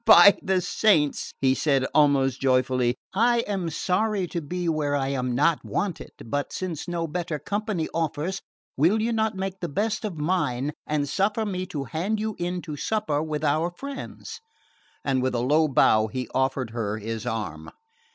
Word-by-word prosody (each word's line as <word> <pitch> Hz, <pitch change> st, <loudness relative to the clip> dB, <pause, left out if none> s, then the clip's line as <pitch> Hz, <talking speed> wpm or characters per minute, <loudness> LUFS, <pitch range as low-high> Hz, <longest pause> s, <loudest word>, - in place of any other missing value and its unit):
"By 200 Hz, -3 st, +9 dB
the 190 Hz, -1 st, +1 dB
saints," 180 Hz, -5 st, +2 dB, 0.2 s
said 135 Hz, -1 st, +2 dB
he, -, -, 0 dB
almost 140 Hz, -3 st, +3 dB
joyously, 130 Hz, -2 st, +2 dB, 0.2 s
"I 235 Hz, +4 st, +3 dB
am 195 Hz, -6 st, -2 dB
sorry 195 Hz, +4 st, 0 dB
to 170 Hz, -, -3 dB
be 175 Hz, +4 st, -3 dB
where 150 Hz, -3 st, +1 dB
I 135 Hz, -1 st, 0 dB
am 125 Hz, -3 st, -1 dB
not 150 Hz, +4 st, +2 dB
wanted; 195 Hz, -5 st, -3 dB, 0.2 s
but 145 Hz, +5 st, -2 dB
since 180 Hz, -4 st, -4 dB
no 170 Hz, -1 st, -2 dB
better 165 Hz, -1 st, -3 dB
company 205 Hz, -1 st, -2 dB
offers, 165 Hz, +3 st, -2 dB, 0.3 s
will 170 Hz, +10 st, +3 dB
you 230 Hz, +2 st, 0 dB
not 220 Hz, -1 st, 0 dB
make 190 Hz, 0 st, -4 dB
the 175 Hz, -, -3 dB
best 215 Hz, +9 st, -1 dB
of 200 Hz, -6 st, -4 dB
mine 150 Hz, -5 st, 0 dB, 0.2 s
and 150 Hz, -1 st, 0 dB
suffer 205 Hz, +8 st, 0 dB
me 185 Hz, -2 st, -3 dB
to 145 Hz, -6 st, -4 dB
hand 175 Hz, -, -2 dB
you 215 Hz, -1 st, -2 dB
in 175 Hz, 0 st, -2 dB
to 155 Hz, -3 st, -5 dB
supper 210 Hz, -6 st, 0 dB
with 155 Hz, -1 st, -3 dB
our 155 Hz, +3 st, +2 dB
friends?" 280 Hz, -, -7 dB, 0.6 s
And 135 Hz, -2 st, +1 dB
with 130 Hz, 0 st, 0 dB
a -, -, +1 dB
low 150 Hz, +6 st, +3 dB
bow 110 Hz, -5 st, +4 dB
he 125 Hz, +2 st, -4 dB
offered 130 Hz, -3 st, 0 dB
her 110 Hz, -2 st, -2 dB
his 110 Hz, +1 st, -5 dB
arm. 100 Hz, -10 st, -4 dB
160 Hz, 175 wpm, -25 LUFS, 135-190 Hz, 0.6 s, By